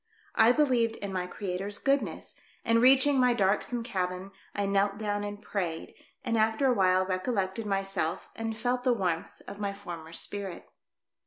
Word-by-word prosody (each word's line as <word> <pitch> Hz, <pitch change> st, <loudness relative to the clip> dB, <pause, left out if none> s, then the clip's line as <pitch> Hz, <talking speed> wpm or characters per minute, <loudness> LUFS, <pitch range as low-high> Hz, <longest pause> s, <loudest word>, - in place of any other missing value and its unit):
I 225 Hz, +2 st, +6 dB
believed 250 Hz, -5 st, +2 dB
in 200 Hz, -1 st, -5 dB
my 180 Hz, -1 st, -2 dB
Creators 195 Hz, +1 st, -4 dB
goodness, 275 Hz, 0 st, -1 dB, 0.3 s
and 230 Hz, 0 st, +4 dB
reaching 270 Hz, +2 st, +6 dB
my 250 Hz, -1 st, +4 dB
dark 195 Hz, -1 st, +2 dB
some 240 Hz, -2 st, -3 dB
cabin, 185 Hz, -3 st, -3 dB, 0.2 s
I 200 Hz, -, 0 dB
knelt 200 Hz, 0 st, +1 dB
down 205 Hz, -1 st, -2 dB
and 205 Hz, 0 st, -5 dB
prayed, 180 Hz, -6 st, -4 dB, 0.3 s
and 230 Hz, -2 st, +1 dB
after 220 Hz, +5 st, +2 dB
awhile 185 Hz, -7 st, +3 dB
recollected 190 Hz, +2 st, -2 dB
myself 195 Hz, -4 st, -1 dB
and 225 Hz, -1 st, -4 dB
felt 245 Hz, +2 st, -1 dB
the 250 Hz, -1 st, +4 dB
warmth 180 Hz, -7 st, -2 dB
of 200 Hz, -, -8 dB
my 200 Hz, -1 st, -2 dB
former 170 Hz, -5 st, -8 dB
spirit. 195 Hz, +1 st, -4 dB
205 Hz, 160 wpm, -29 LUFS, 190-230 Hz, 0.3 s, I